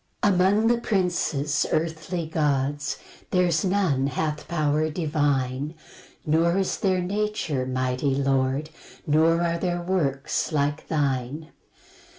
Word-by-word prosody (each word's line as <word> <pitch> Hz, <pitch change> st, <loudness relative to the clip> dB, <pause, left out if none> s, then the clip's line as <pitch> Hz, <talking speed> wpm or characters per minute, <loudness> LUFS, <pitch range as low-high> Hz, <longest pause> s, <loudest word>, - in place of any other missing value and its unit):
1 205 Hz, -, +5 dB
Among 190 Hz, +4 st, +3 dB
the 235 Hz, +1 st, +3 dB
princes, 170 Hz, -8 st, 0 dB
earthly 160 Hz, +1 st, -1 dB
gods, 145 Hz, -2 st, 0 dB, 0.3 s
There's 175 Hz, -4 st, +2 dB
none 180 Hz, -9 st, +1 dB
hath 150 Hz, +2 st, -2 dB
power 155 Hz, -1 st, +1 dB
divine; 145 Hz, -3 st, -1 dB, 0.5 s
Nor 165 Hz, +3 st, +2 dB
is 195 Hz, -1 st, 0 dB
their 185 Hz, -2 st, +1 dB
nature, 195 Hz, -9 st, -1 dB
mighty 130 Hz, +1 st, 0 dB
Lord, 135 Hz, +2 st, 0 dB, 0.3 s
Nor 165 Hz, +2 st, +3 dB
are 170 Hz, 0 st, 0 dB
their 175 Hz, -1 st, -1 dB
works 150 Hz, -8 st, -1 dB
like 145 Hz, 0 st, -1 dB
thine. 145 Hz, +1 st, -1 dB
155 Hz, 115 wpm, -25 LUFS, 140-175 Hz, 0.5 s, 1